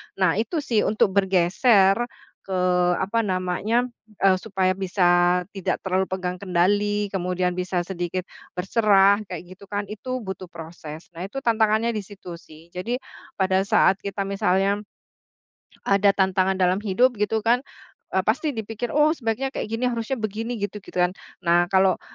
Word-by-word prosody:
Nah, 185 0 +2
itu 300 +7 -2
sih 225 -5 +1
untuk 210 -1 +2
bergeser 195 +3 +3 0.4
ke, 190 - -1 0.4
apa 205 +5 0
namanya, 190 +4 0 0.4
eee, 190 -1 +5
supaya 190 -3 0
bisa 180 -2 +2
tidak 195 -3 -2
terlalu 190 0 0
pegang 180 -1 -3
kendali, 205 +3 +1
kemudian 180 -1 -1
bisa 180 0 -2
sedikit 175 0 -3 0.3
berserah 200 +1 +4
kayak 180 -2 -6
gitu 200 +1 -16
kan, 205 0 -2
itu 255 +3 -5
butuh 190 -1 -6
proses. 165 -1 -10
Nah, 175 +2 -6
itu 270 +6 -6
tantangannya 220 0 +2
di 220 - -3
situ 195 -4 -10
sih. 160 +2 -17
Jadi, 205 +8 -3 0.4
pada 190 -1 +2
saat 195 - +4
kita 200 0 -3
misalnya 195 +1 +1 1.1
ada 200 0 +4
tantangan 190 0 +2
dalam 185 +1 +2
hidup 225 +5 +2
gitu 215 +1 0
kan, 240 +2 +3 0.6
eee, - - +3
pasti 310 - +1
dipikir, 225 +2 -4
“Oh 300 +1 +4
sebaiknya 265 -1 -2
kayak - - -4
gini, 225 +3 -2
harusnya 235 +3 -2
begini 225 +2 -3
gitu," 205 0 -4
gitu - - -14
kan. 180 0 +2 0.3
Nah, 175 0 +3
kalau 190 -1 +3
195 Hz, 150 wpm, -24 LUFS, 180-215 Hz, 1.1 s, eee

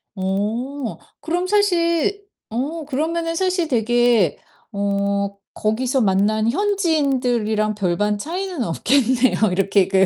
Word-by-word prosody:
어. 220 +7 -2 0.2
그럼 350 +4 -1
사실 395 -1 +1 0.3
어 290 +7 -3
그러면은 330 +4 -2
사실 365 -2 0
되게 240 - +2 0.3
어 200 0 -1 0.2
거기서 245 +4 0
만난 215 +3 +2
현지인들이랑 270 - +1
별반 205 +2 0
차이는 355 - -3
없겠네요. 245 - +2
이렇게 195 +1 +2
그 190 0 +4
245 Hz, 235 characters per minute, -21 LUFS, 205-330 Hz, 0.3 s, 그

